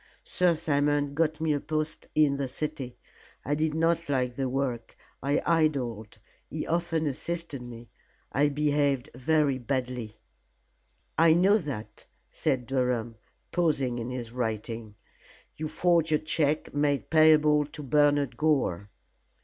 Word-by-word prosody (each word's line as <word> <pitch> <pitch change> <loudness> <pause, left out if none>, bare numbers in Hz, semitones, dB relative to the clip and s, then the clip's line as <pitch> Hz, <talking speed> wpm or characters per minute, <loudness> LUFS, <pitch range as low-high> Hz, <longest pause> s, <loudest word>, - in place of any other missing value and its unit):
Sir 180 -2 +2
Simon 145 -2 +1
got 155 +1 0
me 160 -1 +1
a 145 - 0
post 155 +1 -3
in 150 -2 +4
the 140 -1 -2
city. 130 -2 -4 0.5
I 145 - 0
did 155 +1 0
not 165 0 +1
like 125 -3 0
the 135 -1 -1
work, 125 -3 -3 0.2
and 140 +2 +1
I 165 -1 +3
idled. 120 -8 -3 0.3
He 155 - -4
often 165 -1 0
assisted 150 0 -4
me. 120 -1 -10 0.4
I 145 +2 +3
behaved 145 -2 0
very 140 +1 +1
badly." 125 -3 -3 1.0
"I 165 -1 +7
know 195 +5 +4
that," 140 - -7 0.3
said 125 -2 -1
Durham, 125 -3 -1 0.3
pausing 140 -8 0
in 115 +1 -4
his 125 -2 -5
writing. 115 -2 -4 0.6
"You 155 - -4
forged 165 0 +2
a 155 - +5
check 155 -1 -1
made 145 -1 0
payable 155 -2 +5
to 150 0 -9
Bernard 145 0 +2
Gore." 130 - +1
145 Hz, 135 wpm, -28 LUFS, 125-155 Hz, 1.0 s, I